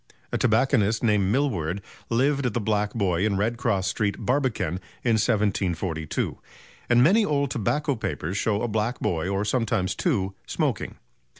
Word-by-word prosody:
A - - 0
tobacconist 115 -2 +2
named 105 -4 +2
Milward 100 - 0 0.3
lived 135 +3 +2
at 115 - -4
the - - +2
"Black 105 0 0
Boy" 95 -5 +1
in 105 -2 +1
Redcross 115 -2 0
Street, 105 -2 0
Barbican, 120 - 0 0.2
in 120 - +2
1742; 95 -7 -1 0.5
and 120 0 +5
many 200 - +5
old 140 -7 0
tobacco 140 +4 0
papers 90 -5 -3
show 105 +1 0
a - - +1
black 110 +2 -1
boy, 85 0 -1
or 100 +1 0
sometimes 115 -4 0
two, 100 - 0
smoking. - - -1
110 Hz, 145 wpm, -25 LUFS, 100-125 Hz, 0.5 s, and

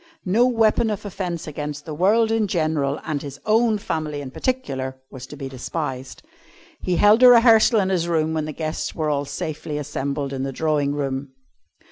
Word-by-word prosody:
No 220 +7 +3
weapon 225 -1 +2
of 210 -1 -4
offence 180 -4 -4
against 145 -1 -6
the 155 - -6
world 215 +8 +3
in 225 -2 +1
general 155 -5 0
and 150 -3 -3
his 140 -1 -8
own 220 0 +3
family 155 -6 -3
in 135 -2 -7
particular, 130 - -3
was 130 -1 -9
to 150 - -10
be 135 -2 -6
despised. 130 - -5 0.6
He 180 - 0
held 210 +6 +5
a 255 - +9
rehearsal 230 -1 +6
in 190 -2 +1
his 175 -3 0
room 160 -2 0
when 155 -1 -1
the 155 - -4
guests 155 0 -4
were 155 -2 -1
all 145 -1 -1
safely 150 +1 -5
assembled 140 -1 -3
in 135 - -3
the 135 0 -2
drawing 145 -1 0
room. 135 -1 -3
155 Hz, 185 wpm, -22 LUFS, 140-205 Hz, 0.6 s, a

